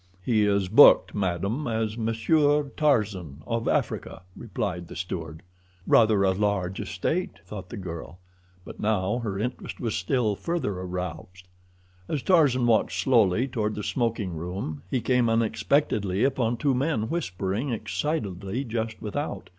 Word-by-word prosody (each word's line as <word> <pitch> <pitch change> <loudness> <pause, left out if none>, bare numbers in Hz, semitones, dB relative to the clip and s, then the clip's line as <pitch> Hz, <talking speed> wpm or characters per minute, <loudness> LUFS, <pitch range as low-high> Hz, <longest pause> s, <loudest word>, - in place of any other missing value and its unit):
"He 110 -3 +3
is 100 -2 +1
booked, 115 +10 +7
madam, 100 - -1
as 110 -2 -1
Monsieur 145 +7 +2
Tarzan, 105 - 0
of 115 0 -2
Africa," - - -1
replied 90 -6 -4
the - - -10
steward. 80 -3 -5 0.4
"Rather 110 -3 +4
a 95 - +4
large 95 -2 -1
estate," 165 - -2
thought 95 -4 -8
the 120 - -7
girl, 85 -2 -7 0.5
but - - -10
now 105 +1 0
her 105 -5 -3
interest 125 +5 -4
was 115 -4 -2
still 110 +3 0
further 170 - -2
aroused. 90 0 -6 0.6
As 145 -4 -2
Tarzan 145 -9 +4
walked 115 -2 +3
slowly 115 -2 +3
toward 110 -4 -2
the 105 - -4
smoking 115 -7 -1
room 85 -2 -5
he 130 - 0
came 125 -2 +2
unexpectedly 110 -2 +1
upon 125 -3 +1
two 135 +3 +1
men 130 -4 0
whispering 105 - -2
excitedly 110 - -2
just 115 -2 -3
without. 145 +8 -4
110 Hz, 140 wpm, -26 LUFS, 95-125 Hz, 0.6 s, booked